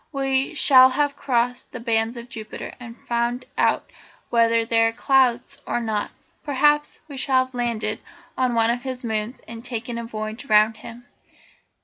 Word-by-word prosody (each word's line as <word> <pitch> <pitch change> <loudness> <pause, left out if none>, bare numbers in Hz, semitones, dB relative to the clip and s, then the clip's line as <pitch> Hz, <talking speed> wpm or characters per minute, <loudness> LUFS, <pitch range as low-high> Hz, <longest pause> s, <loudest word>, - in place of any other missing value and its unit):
We 270 +2 0
shall 260 -2 +7
have 285 +2 0
crossed 250 -2 -1
the 250 - -7
bands 230 0 0
of 235 0 -8
Jupiter, 220 -4 -8
and 235 -1 -10
found 240 +1 -1
out - - +1 0.4
whether 230 -1 +3
they 225 0 +2
are - - 0
clouds 260 +2 +1
or - - 0
not; 220 -3 -2 0.3
perhaps 295 +1 +2
we 285 -3 -9
shall 260 -1 +2
have 260 - -21
landed 230 -2 -2 0.4
on 250 -2 0
one 230 0 +3
of 240 +1 -2
his 260 -1 -5
moons 220 +1 -3
and 230 0 -8
taken 240 -1 -4
a - - -5
voyage 215 +2 -6
round 215 -1 +4
him. 230 +2 -11
240 Hz, 165 wpm, -23 LUFS, 230-260 Hz, 0.4 s, shall